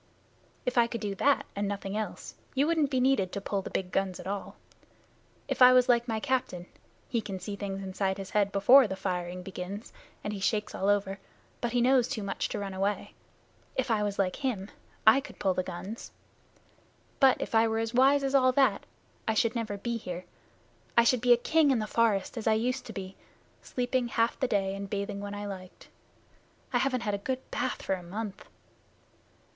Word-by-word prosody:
"If 250 -1 +2
I 235 - +5
could 235 0 -4
do 205 -1 -3
that 280 +8 +2
and 200 0 -1
nothing 200 0 -4
else, 215 0 -4 0.2
you 275 +2 +3
wouldn't 315 -3 +2
be 260 -2 +1
needed 250 -8 +2
to - - -2
pull 200 0 -2
the - - -7
big 180 -1 -3
guns 195 -2 -1
at - - -9
all. 200 +1 -4 0.9
If - - -3
I 250 0 +10
was 250 0 +5
like 240 -1 +3
my 220 -2 -1
captain 250 -8 -1 0.4
he 235 -2 -1
can 195 -3 -6
see 200 +2 -5
things 195 -1 -5
inside 190 0 -1
his 195 -1 -7
head 205 -1 +2
before 245 +6 +7
the 190 - -4
firing 180 -1 -3
begins, 195 +3 -7 0.3
and 210 - -3
he 200 - -5
shakes 210 +2 0
all 195 - 0
over, 200 -1 +1 0.4
but 240 -1 -2
he 245 - +3
knows 250 -1 +4
too 215 - -4
much 195 -1 -2
to - - -3
run 200 -1 -4
away 195 +2 -2 0.6
if 260 -2 0
I 215 -2 +2
was 205 -1 -1
like 185 -2 0
him 225 -8 -3 0.3
I 220 +5 +8
could 290 - -12
pull 190 -2 +1
the 185 - 0
guns. 185 +5 -7 1.1
But 270 -2 +5
if - - -4
I 225 0 +5
were 225 0 -1
as 225 +1 -2
wise 275 +3 +5
as 270 0 -1
all 255 -2 +5
that 260 -6 +2 0.4
I 220 - +1
should 230 +1 +2
never 225 -4 -3
be 235 +3 -2
here. 180 -4 -6 0.7
I 235 - +8
should 235 0 +3
be 245 0 +3
a 240 - +8
king 315 +4 +3
in 265 - +3
the 215 - -1
forest, 220 0 +1
as 220 - -5
I 220 - +5
used 250 +4 -1
to - - -6
be, 190 -1 -7 0.4
sleeping 250 0 -1
half 230 0 0
the 260 - +1
day 195 -3 0
and 195 0 -6
bathing 200 0 -3
when 205 0 -5
I 205 0 -5
liked. 185 -2 -9 0.8
I 245 - +3
haven't 255 -1 0
had 210 -3 -1
a 200 - -1
good 260 +5 -2
bath 255 - -2
for - - 0
a 185 - -3
month." 200 +3 -6
210 Hz, 210 wpm, -29 LUFS, 195-245 Hz, 1.1 s, I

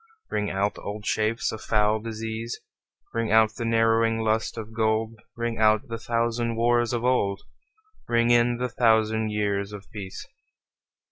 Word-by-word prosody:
Ring 105 -1 -1
out 100 +2 -1
old 105 +1 -6
shapes 110 +1 0
of 110 - -7
foul 105 0 +2
disease, 115 +1 -5 0.5
Ring 115 -2 -1
out 110 0 +5
the 115 - -4
narrowing 115 0 +3
lust 110 +1 0
of 110 0 -7
gold; 110 0 0 0.2
Ring 115 -1 -3
out 110 +4 +3
the 115 0 -4
thousand 115 0 -1
wars 120 0 +2
of 120 -1 -2
old, 100 -6 +1 0.7
Ring 115 0 +2
in 120 0 +4
the 125 +1 -1
thousand 110 -2 +2
years 100 -1 -1
of 105 -1 -9
peace. 95 -3 -7
110 Hz, 150 wpm, -25 LUFS, 110-115 Hz, 0.7 s, out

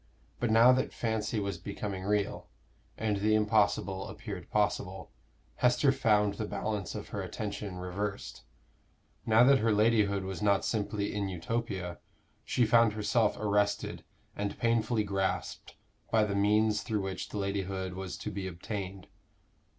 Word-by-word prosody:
But 120 - 0
now 115 +3 +7
that 130 +1 +1
fancy 110 -1 -1
was 100 -3 -3
becoming 100 +1 -5
real, 105 -1 -1 0.5
and 105 -2 0
the 105 +2 +2
impossible 105 -3 +1
appeared - - -7
possible, - - -1 0.5
Esther 125 +3 +4
found 105 -6 +2
the 105 +1 -4
balance 105 -4 -3
of - - -6
her - - -4
attention 100 -2 -5
reversed: 100 +3 -4 0.9
now 110 +2 +6
that 135 +1 +6
her 115 +1 +2
ladyhood 105 -2 +3
was 95 -1 -5
not 100 -1 +2
simply 105 -2 -1
in 100 -2 -2
Utopia, 95 -1 -3 0.4
she 125 - +2
found 115 -1 +5
herself 110 +1 +1
arrested 105 -1 0 0.3
and 100 0 -3
painfully 115 -1 +1
grasped 95 -2 -2 0.3
by 110 -1 +4
the 105 -1 -1
means 105 +1 +3
through 105 0 -2
which 95 -1 -4
the - - -5
ladyhood 95 -2 -2
was 95 0 -5
to - - -5
be 95 -1 -4
obtained. 95 +1 -6
105 Hz, 145 wpm, -30 LUFS, 100-110 Hz, 0.9 s, now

